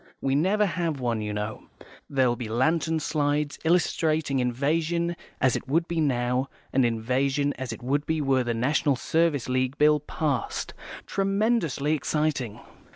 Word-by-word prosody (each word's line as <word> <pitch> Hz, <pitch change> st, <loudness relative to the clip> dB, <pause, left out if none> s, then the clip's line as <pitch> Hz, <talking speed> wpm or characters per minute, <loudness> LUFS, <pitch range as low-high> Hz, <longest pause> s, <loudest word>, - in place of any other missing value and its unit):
We 135 Hz, -, 0 dB
never 190 Hz, +9 st, +3 dB
have 170 Hz, -5 st, -2 dB
one, 120 Hz, -3 st, -1 dB
you 105 Hz, 0 st, -3 dB
know. 105 Hz, +1 st, -4 dB, 0.4 s
There'll 130 Hz, -3 st, +2 dB
be 120 Hz, -3 st, -6 dB
lantern 160 Hz, +7 st, +1 dB
slides, 150 Hz, -1 st, -1 dB
illustrating 160 Hz, -4 st, +1 dB
invasion 160 Hz, +7 st, 0 dB, 0.2 s
as 130 Hz, -, +3 dB
it -, -, -4 dB
would 165 Hz, +5 st, +1 dB
be 170 Hz, -1 st, -1 dB
now, 125 Hz, -2 st, 0 dB, 0.2 s
and 130 Hz, -, +4 dB
invasion 130 Hz, +5 st, +1 dB
as 130 Hz, -2 st, -5 dB
it 115 Hz, -, -8 dB
would 140 Hz, +4 st, 0 dB
be 160 Hz, 0 st, 0 dB
were 135 Hz, -3 st, +2 dB
the 120 Hz, -1 st, -1 dB
National 140 Hz, +4 st, +2 dB
Service 160 Hz, 0 st, +1 dB
League 130 Hz, +1 st, 0 dB
Bill 150 Hz, 0 st, +5 dB
passed. 145 Hz, -2 st, -2 dB, 0.3 s
Tremendously 195 Hz, -, +1 dB
exciting." 150 Hz, -6 st, -1 dB
145 Hz, 150 wpm, -26 LUFS, 125-160 Hz, 0.4 s, Bill